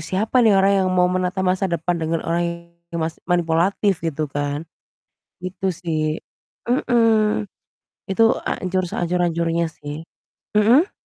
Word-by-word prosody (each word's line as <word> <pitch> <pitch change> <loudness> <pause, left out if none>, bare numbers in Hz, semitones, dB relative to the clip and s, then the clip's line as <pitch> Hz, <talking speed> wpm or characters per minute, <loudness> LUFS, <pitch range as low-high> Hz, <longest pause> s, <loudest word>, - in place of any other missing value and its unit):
siapa 205 +9 +1
nih 220 -4 +5
orang 195 +1 +4
yang 185 - +1
mau 180 - +5
menata 185 +1 -1
masa 185 +1 +1
depan 170 0 -1
dengan 160 +1 -1
orang 170 +1 0 0.5
yang 170 -1 -4
mas 160 0 -5
manipulatif 175 +3 +1
gitu 155 -2 -2
kan. 145 +2 -2 0.8
Gitu 185 +1 -5
sih, 155 -2 -2 0.5
mhm, 225 -5 +2 0.6
Itu 225 +4 +3 0.2
hancur 185 0 -1
sehancur-hancurnya 170 -1 0
sih. 150 +1 -8 0.5
Mhm? 235 - +4
180 Hz, 125 wpm, -21 LUFS, 165-195 Hz, 0.8 s, nih